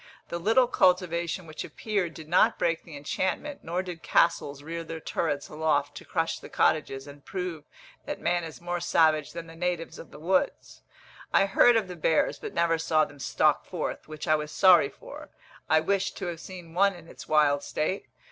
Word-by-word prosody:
The 170 - -3
little 225 +8 +4
cultivation 180 -5 +1
which 155 -1 -6
appeared 195 -7 -3
did 160 -2 -10
not 175 +3 +4
break 165 -1 0
the 155 -4 -10
enchantment, 190 - -3
nor 175 +3 -2
did 175 -3 -7
castles 145 -4 +1
rear 165 +2 -5
their 165 0 -6
turrets 145 -3 -2
aloft 150 -2 0
to - - -10
crush 165 -2 -1
the - - -11
cottages, 135 -3 +1
and 145 0 -13
prove 180 -5 -5 0.4
that - - -4
man 175 0 0
is 160 -2 -8
more 175 0 -3
savage 155 -3 +2
than 170 0 -6
the 165 0 -12
natives 175 -1 -3
of - - -10
the - - -12
woods. 180 +5 -1 0.5
I - - +5
heard 230 +4 +5
of 220 -4 +1
the 180 - -7
bears 160 -1 +1
but - - -6
never 170 -1 +2
saw 155 -1 +2
them 145 - -14
stalk - - +2
forth, - - -5
which 155 -1 -7
I 155 - +4
was 150 0 -1
sorry 175 -4 +6
for; - - -11 0.4
I 160 - +5
wished 195 +4 0
to - - -4
have 170 -2 -4
seen 175 -2 -10
one 200 +2 +3
in 170 -2 -13
its - - -12
wild 150 -2 +3
state. 170 +7 -2
165 Hz, 195 wpm, -27 LUFS, 155-180 Hz, 0.5 s, sorry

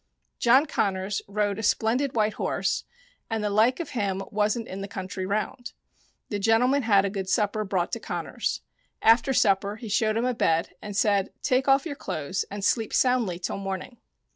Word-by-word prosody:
John 260 +5 +5
Connors 195 -6 -1
rode 205 0 -1
a - - -2
splendid 240 +5 +1
white 215 -1 +2
horse, - - -1 0.4
and 225 -2 -2
the 210 - 0
like 225 - +3
of 335 - -5
him 195 -5 -1
wasn't 215 +2 0
in 190 +1 -6
the 200 - -4
country 190 -2 -5
round. 215 +5 -3 0.6
The 205 - -2
gentleman 245 +7 +3
had 200 -4 +4
a - - 0
good 190 -2 -4
supper 215 0 +1
brought 190 -3 -1
to - - -3
Connors. - - -3 0.4
After 230 +4 +5
supper 200 -4 +2
he 220 0 -8
showed 215 +1 +1
him 235 - +1
a 255 - +1
bed 165 -7 +1
and 205 -1 -6
said, 200 -2 +2
"Take 260 +1 +1
off 270 +2 +4
your 300 -4 -4
clothes 160 - -3
and 200 0 -4
sleep 225 -1 +1
soundly 245 -9 +2
till 175 - -4
morning." 195 +4 -5
210 Hz, 185 wpm, -26 LUFS, 195-235 Hz, 0.6 s, John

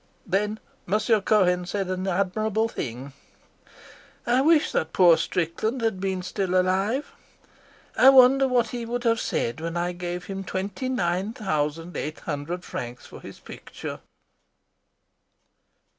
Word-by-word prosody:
'" - - -38
Then 210 +2 0 0.3
Monsieur 215 +3 +2
Cohen 180 -4 +2
said 195 -1 -2
an 185 +1 -2
admirable 215 +4 0
thing. 130 - -6 1.1
"I 245 +2 +3
wish 310 +1 +4
that 160 - -1
poor 175 -3 +6
Strickland 185 +10 -2
had 220 -4 0
been 190 -1 -2
still 185 0 0
alive. 195 +9 0 0.8
I 265 - +7
wonder 270 +1 +6
what 245 -3 +1
he 240 0 -5
would 240 +1 -3
have 230 -2 +2
said 115 +6 -2
when 165 +1 -3
I 175 +1 -1
gave 175 0 -5
him 195 0 -5
twenty 195 +7 -4
nine 190 -2 -1
thousand 165 -5 -2
eight 155 +1 -5
hundred 165 +4 -4
francs 120 0 -6
for - - -12
his - - -11
picture." - - -8
190 Hz, 140 wpm, -25 LUFS, 175-225 Hz, 1.1 s, I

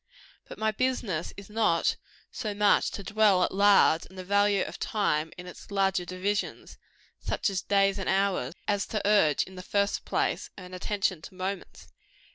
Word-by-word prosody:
But - - -10
my 220 0 +1
business 215 -8 -1
is 200 -1 -10
not 215 -6 +1 0.4
so 210 -3 -4
much 205 0 +3
to 200 - -7
dwell 210 -3 +3
at - - -1
large 200 -4 +4
on 190 - -16
the 185 - -7
value 200 0 +2
of - - -8
time 160 -7 0
in 180 - -8
its 180 - -11
larger 195 -2 +1
divisions, 185 +3 -3 0.4
such - - -1
as 190 -1 -2
days 195 0 +2
and 190 - -2
hours, 190 -7 0
as 205 -1 0
to 210 -2 -2
urge, 195 -9 +4
in 190 - -13
the 185 - -8
first 200 +2 0
place, - - -1
an 185 -1 -10
attention 185 -2 -1
to 185 - -11
moments. 190 +1 -6
195 Hz, 175 wpm, -28 LUFS, 185-205 Hz, 0.4 s, large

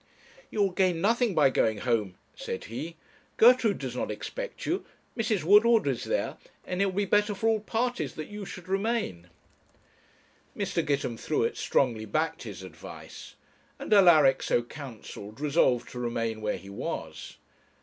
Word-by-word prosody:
'You 210 - +1
will 195 - +1
gain 180 -2 +1
nothing 230 +1 +2
by 145 -4 +5
going 110 -4 +2
home,' 105 -6 0 0.2
said 95 - -5
he; 155 +9 -6 0.4
'Gertrude 235 -3 +6
does 130 -3 -5
not - - -2
expect - - -6
you; 365 +3 -1 0.3
Mrs. 215 -5 0
Woodward 210 +5 +6
is 135 -4 -1
there; - - -1 0.3
and 180 +1 -2
it 200 - +3
will 190 - -3
be 200 +2 0
better 205 +1 +2
for 220 +4 -1
all 220 -1 +3
parties 240 +4 -2
that 155 - -5
you 210 0 -7
should 180 -2 -9
remain.' 195 - -1 1.3
Mr. - - -1
Gitemthruet 140 -5 -1
strongly 115 -5 +1
backed 155 +9 -1
his 100 -5 -8
advice, 85 -4 -11 0.4
and - - -1
Alaric, 160 -9 +6
so 120 - +1
counselled, 120 -5 -9
resolved 145 -5 +2
to 125 - -7
remain 115 -2 -2
where 105 -1 -1
he 100 - -11
was. 80 - -6
155 Hz, 155 wpm, -28 LUFS, -, 1.3 s, Gertrude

